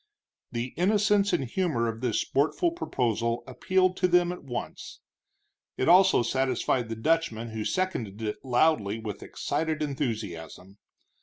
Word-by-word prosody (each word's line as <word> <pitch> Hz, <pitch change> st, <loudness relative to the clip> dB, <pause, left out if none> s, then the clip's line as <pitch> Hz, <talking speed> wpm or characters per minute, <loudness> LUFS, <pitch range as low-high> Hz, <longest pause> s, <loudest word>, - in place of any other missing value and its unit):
The 120 Hz, +1 st, -4 dB
innocence 205 Hz, +2 st, +3 dB
and -, -, +1 dB
humor 135 Hz, -4 st, 0 dB
of 115 Hz, 0 st, -4 dB
this 125 Hz, -4 st, 0 dB
sportful 160 Hz, -, +1 dB
proposal 120 Hz, -, -1 dB
appealed 185 Hz, +8 st, +1 dB
to -, -, +2 dB
them 175 Hz, 0 st, +3 dB
at 180 Hz, -, -8 dB
once. 125 Hz, -3 st, -6 dB, 0.8 s
It 130 Hz, -, 0 dB
also 185 Hz, -5 st, +6 dB
satisfied 130 Hz, -1 st, 0 dB
the 115 Hz, -, -3 dB
Dutchman, 115 Hz, -3 st, 0 dB
who 110 Hz, -1 st, -4 dB
seconded 120 Hz, -, -2 dB
it 110 Hz, -2 st, -4 dB
loudly, 120 Hz, -5 st, +2 dB
with 110 Hz, -3 st, -6 dB
excited 155 Hz, +1 st, -2 dB
enthusiasm. 105 Hz, -, -5 dB
130 Hz, 135 wpm, -27 LUFS, 115-175 Hz, 0.8 s, also